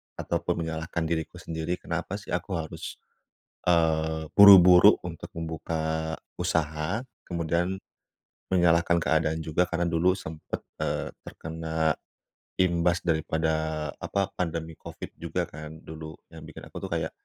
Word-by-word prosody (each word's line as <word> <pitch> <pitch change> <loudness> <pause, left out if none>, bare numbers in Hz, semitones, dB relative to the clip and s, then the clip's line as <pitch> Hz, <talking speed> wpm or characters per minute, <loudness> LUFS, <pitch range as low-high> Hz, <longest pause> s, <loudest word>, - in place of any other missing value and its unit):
ataupun 85 - -1
menyalahkan 80 +1 -3
diriku 80 +1 -2
sendiri 85 0 -3
kenapa 85 +3 -3
sih 100 - -14
aku 100 - -2
harus 80 -2 -5 0.7
eee, 80 -2 +2
buru-buru 95 -1 +10
untuk 85 -2 -6
membuka 80 -1 -2 0.3
usaha 80 +3 0 0.3
kemudian 85 +2 0 0.8
menyalahkan 85 -1 +4
keadaan 80 0 +1
juga 80 +2 +1
karena 85 0 -1
dulu 85 +2 +3
sempat, 80 -5 -6 0.2
eee, - - -1 0.2
terkena 80 -1 -2 0.7
imbas 85 -1 +2
daripada 80 -2 0
apa 100 -1 -1
pandemi 80 -2 -3
COVID - - -9
juga - - -2
kan 80 +1 -9
dulu 80 -1 -8 0.2
yang - - -11
bikin - - -10
aku - - -9
tuh - - -5
kayak, - - -1
80 Hz, 120 wpm, -27 LUFS, 80-85 Hz, 0.8 s, buru-buru